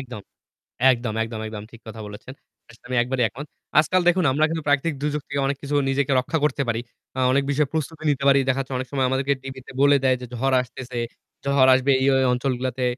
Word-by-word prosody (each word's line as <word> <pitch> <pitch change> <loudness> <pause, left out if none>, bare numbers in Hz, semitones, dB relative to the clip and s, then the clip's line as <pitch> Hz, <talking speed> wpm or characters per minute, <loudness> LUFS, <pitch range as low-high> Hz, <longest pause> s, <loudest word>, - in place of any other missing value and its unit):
একদম, 125 -5 -8 0.7
একদম, 120 -2 -3
একদম, 115 -1 -5
একদম 105 -1 -6
ঠিক 115 - -14
কথা 110 0 -8
বলেছেন। 105 +5 -10 0.4
আসলে 120 - -19
আমি 125 - -2
একবারই 125 +1 -1
একমত। 145 +7 -9 0.3
আজকাল 170 +4 +3
দেখুন 175 -1 +3
আমরা 155 +3 +2
কিন্তু 160 -1 -3
প্রাকৃতিক 145 +2 +2
দুর্যোগ 150 0 -1
থেকে 140 0 -2
অনেক 140 0 -1
কিছু 145 +1 -3
নিজেকে 140 0 0
রক্ষা 160 +6 -2
করতে 140 -1 +1
পারি। 115 0 0 0.4
আ - - +1
অনেক 140 +1 +3
বিষয়ে 145 0 +1
প্রস্তুতি 155 0 -4
নিতে 140 -1 -1
পারি। 135 0 +6
দেখাচ্ছে 135 +1 -1
অনেক 130 - -4
সময় 135 -2 +1
আমাদেরকে 135 +1 +1
টিভিতে 135 -1 -9
বলে 140 0 +6
দেয় 130 -1 +4
যে 125 - -7
ঝড় 135 +2 +1
আসতেছে, 125 -1 -8 0.5
ঝড় 140 -1 +4
আসবে 130 +2 +2
এই - - +2 0.3
অঞ্চলগুলাতে। 125 0 -2
135 Hz, 205 wpm, -23 LUFS, 125-140 Hz, 0.7 s, পারি